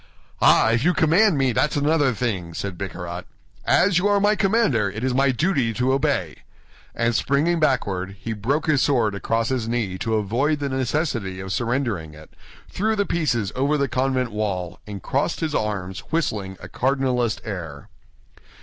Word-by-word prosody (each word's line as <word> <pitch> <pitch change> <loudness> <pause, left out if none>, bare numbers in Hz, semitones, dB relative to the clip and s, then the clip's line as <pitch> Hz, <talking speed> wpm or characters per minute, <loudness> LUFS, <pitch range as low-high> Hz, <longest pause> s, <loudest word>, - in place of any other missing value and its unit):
"Ah, 110 - +5
if 115 +2 +1
you 180 +3 +3
command 170 +3 +4
me, 135 -2 +2
that's 150 +6 +1
another 145 -1 +2
thing," 95 -8 -3
said 100 -2 -4
Bicarat. 90 -2 -6 0.4
"As 185 -1 +4
you 195 - +1
are 205 0 +3
my 205 +1 +3
commander, 195 - +2
it 110 +4 -6
is 130 -1 +1
my 135 +1 +3
duty 130 -3 +1
to 125 +3 +1
obey." 135 - 0 0.6
And 115 0 +1
springing 145 +8 +1
backward, 100 - 0
he 115 - -4
broke 130 +9 -1
his 150 -4 +2
sword 120 -7 +2
across 115 +3 -1
his 125 -4 -1
knee 105 -6 -2
to 110 +3 -1
avoid 120 +9 +1
the 140 -1 -3
necessity 130 - -2
of 95 0 -4
surrendering 115 - -2
it, 75 0 -14 0.4
threw 220 +3 -1
the 200 -1 +1
pieces 125 - 0
over 140 +4 +1
the 140 -1 +1
convent 130 0 0
wall, 95 -5 -3
and 100 -2 -7
crossed 140 +5 -1
his 160 -2 -2
arms, 100 -5 -2
whistling 105 - -2
a 90 - -9
cardinalist 125 0 0
air. 85 -9 -6
125 Hz, 170 wpm, -23 LUFS, 100-145 Hz, 0.6 s, Ah